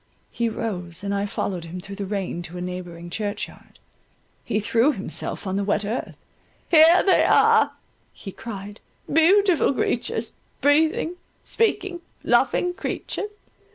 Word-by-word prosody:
He 235 -1 0
rose, 185 -6 -4
and 200 0 -2
I 200 0 0
followed 185 -4 -3
him 170 +2 -7
through 195 +2 -9
the 200 -2 -4
rain 190 -3 -3
to 180 - -8
a - - -5
neighbouring 175 -1 -6
church 205 +2 -2
yard - - -18 0.7
—he 210 - -1
threw 230 +6 +3
himself 200 +1 -4
on 190 0 -1
the 200 - 0
wet 205 +1 0
earth. 220 +5 -4 0.5
"Here 330 +2 +7
they 385 - +4
are," - - +5 0.4
he 195 - -9
cried, 205 -1 -8 0.3
"beautiful 360 +2 +5
creatures—breathing, 290 +9 0 0.3
speaking, 385 -6 0 0.2
loving 355 0 +2
creatures. 415 +2 -4
210 Hz, 135 wpm, -24 LUFS, 190-315 Hz, 0.7 s, Here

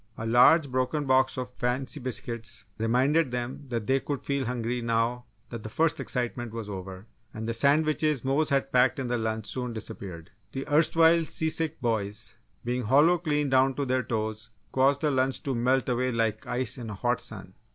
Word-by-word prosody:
A 110 - -5
large 130 +6 +5
broken 130 +4 0
box 130 0 +3
of 125 -1 -5
fancy 130 +5 -2
biscuits 115 -4 -3
reminded 130 +7 +2
them 125 +3 -4
that 115 -3 -2
they 135 +3 +2
could 140 +1 -4
feel 140 -1 -1
hungry 120 0 -2
now 115 +1 0 0.3
that 115 -2 -6
the 110 - -7
first 160 +8 +1
excitement 120 -2 -3
was 115 -2 -5
over, 95 -1 -7 0.3
and 110 +1 -5
the 115 - -1
sandwiches 150 +2 +2
Mose 145 +4 +2
had 135 -1 +1
packed 125 +4 +3
in 130 -3 -3
the 120 -1 0
lunch 110 -1 -2
soon 125 +2 -4
disappeared. 95 -5 -8 0.2
The 135 +1 -4
erstwhile 165 +2 +4
seasick 160 0 -1
boys, 105 -3 -1 0.3
being 125 0 -1
hollow 150 +9 +5
clean 150 -4 0
down 130 0 +4
to 140 - -1
their 130 0 +1
toes, 110 -1 -4 0.2
caused 135 +1 +3
the 150 - +2
lunch 130 0 0
to 135 - -1
melt 125 +2 +1
away 125 0 0
like 115 -2 -1
ice 125 0 -1
in 115 -2 -6
a 105 - -5
hot 120 +4 0
sun. 95 -4 -8
125 Hz, 185 wpm, -27 LUFS, 115-140 Hz, 0.3 s, large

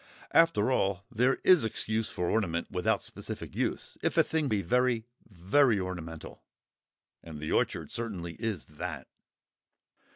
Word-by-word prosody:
After 150 -9 +4
all 100 -4 0
there 125 +3 +3
is 185 -4 +6
excuse 110 0 -1
for 90 - -2
ornament 85 -6 0
without 90 -1 +1
specific - - -7
use, - - -2
if - - -1
a - - +7
thing 160 -2 0
be 105 -5 0
very, 125 +3 +2 0.2
very 105 +5 +3
ornamental—and 80 -2 -10
the 75 - -4
orchard - - 0
certainly 95 -8 -4
is 110 -7 -2
that. 75 - -6
105 Hz, 130 wpm, -30 LUFS, 90-125 Hz, 0.2 s, a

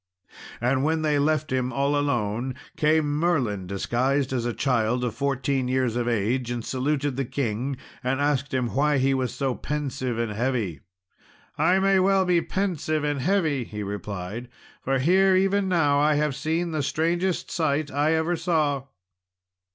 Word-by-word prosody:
And 130 +3 +1
when 160 +1 +1
they 150 -2 +2
left 155 0 +1
him 130 -1 0
all 140 +2 +1
alone 125 -3 -1 0.2
came 150 -1 +2
Merlin, 125 - 0
disguised 130 +8 0
as 120 -2 -1
a - - 0
child 125 -1 0
of 120 -3 -1
fourteen 135 +1 -1
years 130 -2 0
of 120 -1 -1
age, 120 +2 0
and 120 -2 -3
saluted 140 +1 -1
the 135 - 0
king, 130 +1 -2 0.3
and 130 +2 0
asked 145 -1 0
him 125 -2 0
why 145 +1 +2
he 135 +1 +2
was 130 -2 -1
so 130 +1 -1
pensive 135 -4 -3
and 115 -2 -1
heavy. 110 - -1 0.8
"I 185 - +3
may 195 0 +3
well 190 0 +3
be 175 -2 +3
pensive 165 -6 -1
and 145 -2 -1
heavy," 160 -6 +1
he 105 -2 -6
replied, 100 +3 -5 0.3
"for 135 +1 +1
here 185 +7 +4
even 195 +1 +2
now 145 -5 +3
I 150 +1 +3
have 150 -2 0
seen 165 +3 -1
the 155 -2 -1
strangest 170 +5 -1
sight 155 -2 0
I 150 +3 +2
ever 160 +2 +1
saw." 155 -5 0
140 Hz, 165 wpm, -25 LUFS, 125-155 Hz, 0.8 s, here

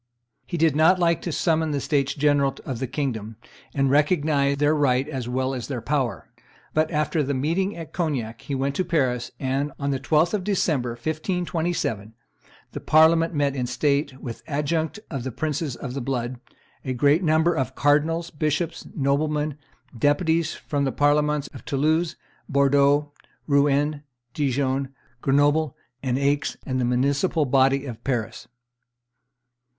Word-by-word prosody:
He 175 - -3
did 160 -3 +3
not 160 +4 +5
like 170 -2 +2
to 175 - -3
summon 160 0 +1
the 145 -1 -1
states 140 -1 0
general 145 -2 +2
of 130 -4 -4
the 130 - -2
kingdom, 120 -5 -3 0.4
and 135 -1 +1
recognize 145 -2 +2
their 145 +1 +3
right 135 -3 +2
as 130 -5 -4
well 130 +1 -1
as 125 -3 -5
their 130 -4 -3
power; 125 -3 -2 0.5
but, 155 0 +2
after 155 0 0
the 140 0 -1
meeting 170 +9 0
at 165 -2 -8
Cognac, 130 -10 -2
he 140 - -4
went 135 +1 -1
to 185 - +2
Paris, 130 -8 0
and, 135 +2 -1
on 140 0 -1
the 135 - -1
12th 155 - +2
of 205 -3 0
December, 155 - 0
1527, 160 - -2 0.6
the - - -5
Parliament 165 +1 +4
met 140 -1 +1
in 125 -2 -2
state 140 +1 0
with 120 -3 -7
the - - -19
adjunct 155 +5 -1
of 135 -5 -3
the 130 - -4
princes 150 +1 -2
of 125 0 -6
the 135 - -3
blood, 125 -1 -3 0.4
a 130 - -2
great 145 +7 +3
number 160 +1 +3
of 130 -4 -2
cardinals, 155 +4 +2
bishops, 155 +2 -2
noblemen, 150 +1 0 0.4
deputies 160 +5 +1
from 145 -1 -2
the 135 - 0
Parliaments 150 0 +2
of 130 - -10
Toulouse, 155 +4 +1 0.3
Bordeaux, 140 +1 +3 0.3
Rouen, 145 +1 +2 0.3
Dijon, 135 -1 -1 0.3
Grenoble, 145 +2 +2 0.2
and 130 -2 0
Aix, 140 +1 0
and 130 -1 -1
the - - +1
municipal 140 +6 +1
body 135 +1 +3
of 120 -3 -8
Paris. 115 -4 -3
145 Hz, 155 wpm, -24 LUFS, 130-155 Hz, 0.6 s, not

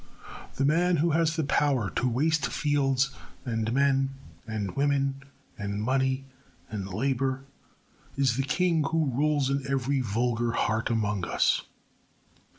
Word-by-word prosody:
The 135 - +1
man 175 +5 +3
who 165 +3 +2
has 160 0 +2
the 160 - 0
power 140 -6 +1
to 125 - 0
waste 150 +4 +1
fields 135 -2 +1 0.3
and 115 -2 -1
men 135 0 +2 0.3
and 105 -4 -3
women 140 -1 +1 0.4
and 100 0 -3
money 130 +3 0 0.5
and 100 -3 -4
labour 130 +4 -1 0.7
is 135 -4 +2
the 135 - +1
king 165 +3 +1
who 160 -2 +1
rules 145 0 +1
in 140 0 0
every 135 0 +1
vulgar 120 +1 0
heart 110 0 0
among 105 -5 0
us. - - +2
135 Hz, 135 wpm, -27 LUFS, 115-145 Hz, 0.7 s, man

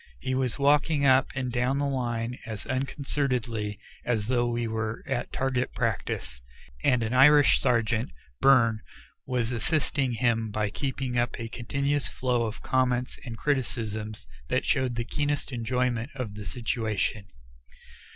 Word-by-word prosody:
He 130 - -2
was 130 -3 0
walking 145 +1 +3
up 130 0 +5
and 130 -2 -2
down 125 +3 +1
the 145 - 0
line 120 -3 -2
as 110 -3 -6
unconcernedly 130 -6 -1 0.3
as 110 -4 0
though 120 -1 +2
we 120 0 -1
were 110 0 -3
at 135 -3 -2
target 130 -1 -1
practice, 65 +1 -2 0.4
and 125 -4 +3
an 110 +2 -2
Irish 145 +3 +7
sergeant, 115 -3 +1 0.3
Byrne, 115 -5 +5 0.5
was 125 -2 0
assisting 135 +1 +1
him 115 -1 +1
by 105 0 -1
keeping 130 -2 -2
up 120 -1 -1
a 115 -1 -4
continuous 140 +5 -1
flow 125 -2 0
of 110 - -7
comments 125 -1 0
and 115 -2 -6
criticisms 110 -6 -2 0.2
that - - 0
showed 130 -2 +1
the 120 0 -2
keenest 145 +1 -1
enjoyment 125 0 -1
of 125 -6 -4
the 105 -1 -7
situation. 110 -1 -1
125 Hz, 140 wpm, -27 LUFS, 115-130 Hz, 0.5 s, Irish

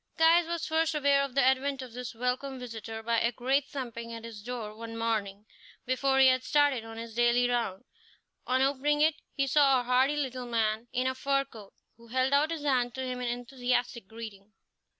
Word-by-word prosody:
Caius 330 +1 +5
was 340 -1 -3
first 320 0 +1
aware 280 -1 +3
of 275 -2 -4
the 275 - +4
advent 265 +1 +1
of 250 -3 -11
this 245 -1 -6
welcome 250 +3 -2
visitor 225 -2 -7
by 230 0 +1
a 235 - +2
great 265 +4 0
thumping 235 -5 -6
at 230 0 -7
his 225 -3 -9
door 225 -2 -6
one 230 0 -7
morning 215 -3 -2 0.4
before 265 +1 +1
he 265 - +7
had 255 0 +4
started 290 -5 +2
on 225 0 -9
his 230 0 -7
daily 240 +1 +3
round. 235 -5 -1 0.6
On 255 +1 +2
opening 285 +2 +1
it, 310 +1 +5 0.2
he 275 - +1
saw 275 -1 +4
a - - -3
hardy 255 +4 +3
little 255 -3 -3
man 225 -1 0
in 255 0 -1
a 260 - +1
fur 275 +1 0
coat, 220 -7 -13 0.2
who 235 0 -17
held 260 +3 +1
out 290 +2 +4
his 325 -3 -4
hand 250 -4 +1
to 265 - -3
him 250 -1 -4
in 250 - -2
enthusiastic 245 -2 -2
greeting. 215 -2 -10
250 Hz, 205 wpm, -29 LUFS, 230-275 Hz, 0.6 s, he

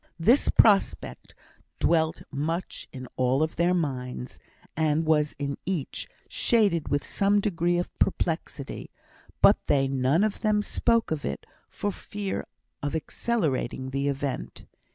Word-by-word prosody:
This 230 +12 +4
prospect 205 -3 +2 0.4
dwelt 160 -1 +2
much 160 +5 -3
in 130 -1 -8
all 130 +3 +2
of 155 - -2
their 175 +2 +2
minds, 125 -6 -3 0.4
and 155 0 +1
was 150 -1 +2
in 140 -1 -3
each 175 -7 -3 0.2
shaded 200 -9 +2
with 145 0 0
some 200 +1 +2
degree 175 -4 +1
of 175 - -3
perplexity; 160 -6 -2 0.5
but - - +7
they 135 -1 +3
none 135 +6 +2
of 215 -1 -1
them 210 -1 +2
spoke 230 0 +1
of 155 -2 -2
it 70 - -4 0.2
for 205 - -2
fear 200 0 -5 0.3
of 145 +2 -2
accelerating 150 - -1
the 140 +1 -1
event. 140 -1 -3
160 Hz, 130 wpm, -27 LUFS, 140-195 Hz, 0.5 s, but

